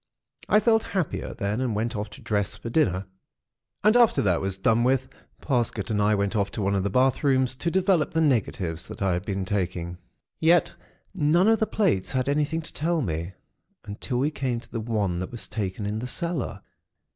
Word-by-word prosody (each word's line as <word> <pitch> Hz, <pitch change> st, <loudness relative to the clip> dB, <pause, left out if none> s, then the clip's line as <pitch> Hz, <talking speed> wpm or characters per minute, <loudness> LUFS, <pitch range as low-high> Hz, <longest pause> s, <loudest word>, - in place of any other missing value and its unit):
I 210 Hz, -, +6 dB
felt 225 Hz, +1 st, +3 dB
happier 185 Hz, -8 st, -3 dB
then, 105 Hz, +4 st, -2 dB
and 120 Hz, -5 st, -1 dB
went 115 Hz, +3 st, -1 dB
off 105 Hz, 0 st, -3 dB
to -, -, -13 dB
dress 100 Hz, -2 st, -1 dB
for 115 Hz, -, -7 dB
dinner; 100 Hz, -, +1 dB, 0.8 s
and 215 Hz, +3 st, +5 dB
after 240 Hz, -2 st, +5 dB
that 90 Hz, -5 st, +2 dB
was 95 Hz, -1 st, -2 dB
done 115 Hz, +4 st, +2 dB
with, 130 Hz, +1 st, +2 dB, 0.3 s
Parsket 120 Hz, -6 st, -1 dB
and 105 Hz, -1 st, +1 dB
I 105 Hz, +1 st, +3 dB
went 100 Hz, +2 st, -1 dB
off 100 Hz, -2 st, +1 dB
to -, -, -3 dB
one 100 Hz, +1 st, +1 dB
of 100 Hz, -, +1 dB
the 100 Hz, -, -1 dB
bath 130 Hz, +7 st, +2 dB
rooms 130 Hz, -2 st, +3 dB
to 170 Hz, -, -1 dB
develop 185 Hz, -2 st, +2 dB
the 160 Hz, -, -1 dB
negatives 100 Hz, -, 0 dB
that -, -, -6 dB
I 95 Hz, -2 st, +2 dB
had 90 Hz, +2 st, -3 dB
been 95 Hz, -2 st, -2 dB
taking. 90 Hz, -3 st, -2 dB, 0.4 s
Yet 170 Hz, +2 st, +4 dB, 0.4 s
none 170 Hz, +2 st, +3 dB
of 225 Hz, -1 st, +4 dB
the 220 Hz, -, +1 dB
plates 180 Hz, -, 0 dB
had 130 Hz, 0 st, 0 dB
anything 150 Hz, +3 st, 0 dB
to -, -, -7 dB
tell 165 Hz, 0 st, 0 dB
me, 85 Hz, -1 st, -3 dB, 0.5 s
until 105 Hz, +5 st, -4 dB
we 140 Hz, +5 st, +1 dB
came 130 Hz, -5 st, -2 dB
to -, -, -16 dB
the 115 Hz, -, -3 dB
one 105 Hz, -6 st, -1 dB
that 95 Hz, -, -4 dB
was 120 Hz, -, -5 dB
taken 100 Hz, -2 st, -3 dB
in 105 Hz, +2 st, -2 dB
the 125 Hz, -, -4 dB
cellar. 160 Hz, -, -3 dB
115 Hz, 205 wpm, -26 LUFS, 100-155 Hz, 0.8 s, I